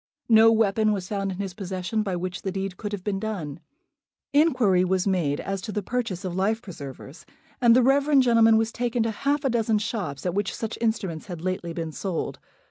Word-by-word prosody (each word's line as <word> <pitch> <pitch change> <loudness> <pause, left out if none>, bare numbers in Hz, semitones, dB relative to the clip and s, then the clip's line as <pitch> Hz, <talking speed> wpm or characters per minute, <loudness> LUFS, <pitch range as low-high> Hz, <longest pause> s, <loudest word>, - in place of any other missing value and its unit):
No 225 0 +7
weapon 215 -1 +2
was 190 -3 -4
found 195 -1 -2
in 185 - -6
his 195 -2 -4
possession 190 +3 -3
by 195 -4 -2
which 180 +1 -4
the 190 - -3
deed 195 -1 -3
could 205 +2 -5
have 200 -3 -5
been 195 -1 -1
done. 180 -9 -4 0.7
Inquiry 255 - +4
was 185 0 +1
made 170 -8 +1
as 195 -1 -3
to 215 - -5
the 210 -1 -2
purchase 215 -5 -3
of 180 - -3
life 205 +4 +1
preservers, 145 - -10 0.4
and 235 -1 +6
the 255 - +5
reverend 275 +1 +4
gentleman 230 -2 +5
was 225 0 +1
taken 240 -1 -1
to 225 - 0
half 280 +7 -1
a - - +3
dozen 225 -2 +2
shops 195 - -4
at 180 - 0
which 200 0 -1
such 225 -1 -4
instruments 205 -8 -1
had 175 -4 -7
lately 185 -2 -2
been 165 -1 -4
sold. 180 +2 -4
200 Hz, 210 wpm, -25 LUFS, 185-225 Hz, 0.7 s, No